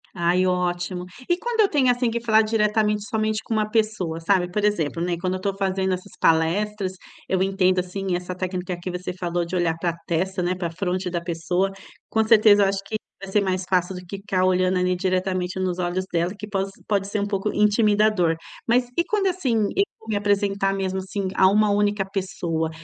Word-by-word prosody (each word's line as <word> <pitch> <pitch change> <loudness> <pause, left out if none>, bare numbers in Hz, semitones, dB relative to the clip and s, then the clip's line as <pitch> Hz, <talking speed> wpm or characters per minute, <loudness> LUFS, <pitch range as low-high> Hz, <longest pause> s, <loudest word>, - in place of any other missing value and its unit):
Ai, 175 +1 +2
ótimo. 180 0 -1 0.2
E 350 - +3
quando 465 +2 0
eu 405 - +4
tenho, 270 -4 +3
assim, 245 -1 +2
que 235 - -1
falar 220 -2 +4
diretamente 210 -1 +1
somente 215 0 -1
com - - -4
uma 215 -1 0
pessoa, 215 -7 0
sabe? 180 +1 +1
Por 210 +3 -1
exemplo, 170 -6 0
né, 175 0 0
quando 185 +2 -2
eu - - -2
estou 195 +1 -2
fazendo 190 -1 0
essas 185 +2 -6
palestras, 185 +5 +1 0.4
eu 190 -1 +1
entendo, 190 -1 +2
assim, 185 +1 -2
essa 180 +1 -4
técnica 185 -1 -3
que 180 - -4
você 180 0 -4
falou 175 -1 -2
de 170 - -5
olhar 170 -2 +1
pra 170 -1 -1
testa, 180 +2 -1
né, 175 +1 +1
pra 180 -2 -3
fronte 185 +2 -2
da 175 -1 -2
pessoa. 175 +3 -1 0.4
Com 220 - +2
certeza, 215 -2 +6
eu - - +4
acho 195 0 0
que 215 +2 -3 0.2
vai 195 -1 -7
ser 210 - +3
mais 185 -1 -1
fácil 185 0 +1
do 180 - -6
que 195 +3 -6
ficar 195 -2 -1
olhando 185 0 +2
ali 180 0 +1
diretamente 185 0 -1
nos 185 -1 -1
olhos 180 +1 -1
dela, 175 +2 0
que 210 +1 -7
poss 195 -1 -2 0.2
pode 200 -2 0
ser 210 +1 -2
um 200 - -1
pouco 200 0 -1
intimidador. 210 -4 +3 0.3
Mas 245 +1 +3
e 340 - +4
quando, 410 -2 +1
assim, 355 -10 0 0.2
eu 395 - +5 0.2
vou 220 - -14
me 215 - 0
apresentar 200 -1 +1
mesmo, 190 -1 -2
assim, 190 +1 -3
a 190 - +6
uma 210 +2 +4
única 205 0 +2
pessoa? 180 -4 -2
190 Hz, 210 wpm, -23 LUFS, 180-210 Hz, 0.4 s, certeza